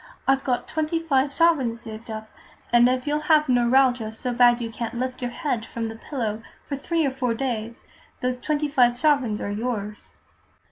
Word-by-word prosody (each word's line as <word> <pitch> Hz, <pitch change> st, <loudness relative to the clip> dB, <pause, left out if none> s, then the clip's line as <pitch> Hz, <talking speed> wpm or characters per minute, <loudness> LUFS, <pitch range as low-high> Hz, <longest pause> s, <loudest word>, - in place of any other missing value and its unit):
I've 270 Hz, 0 st, +3 dB
got 250 Hz, -2 st, -1 dB
twenty 315 Hz, +1 st, -1 dB
five 280 Hz, -4 st, +1 dB
sovereigns 275 Hz, -8 st, +2 dB
saved 225 Hz, 0 st, -9 dB
up, 220 Hz, 0 st, -6 dB, 0.5 s
and 240 Hz, +1 st, +6 dB
if 255 Hz, 0 st, -1 dB
you'll 295 Hz, 0 st, 0 dB
have 305 Hz, -1 st, +5 dB
neuralgia 245 Hz, -2 st, +3 dB
so 245 Hz, +3 st, -4 dB
bad 240 Hz, 0 st, +5 dB
you 230 Hz, -1 st, -4 dB
can't 235 Hz, 0 st, -5 dB
lift 255 Hz, +1 st, -3 dB
your 245 Hz, -, -1 dB
head 250 Hz, -4 st, -2 dB
from 225 Hz, 0 st, -4 dB
the 225 Hz, -, -7 dB
pillow 225 Hz, -3 st, -4 dB, 0.3 s
for 285 Hz, -, -2 dB
three 325 Hz, +3 st, 0 dB
or 275 Hz, -, +1 dB
four 250 Hz, -3 st, -1 dB
days, 235 Hz, -3 st, -4 dB, 0.4 s
those 250 Hz, 0 st, -2 dB
twenty 300 Hz, +2 st, -1 dB
five 245 Hz, -4 st, +3 dB
sovereigns 270 Hz, -8 st, +2 dB
are 200 Hz, -, -3 dB
yours." 210 Hz, -1 st, -4 dB
250 Hz, 185 wpm, -24 LUFS, 230-275 Hz, 0.5 s, and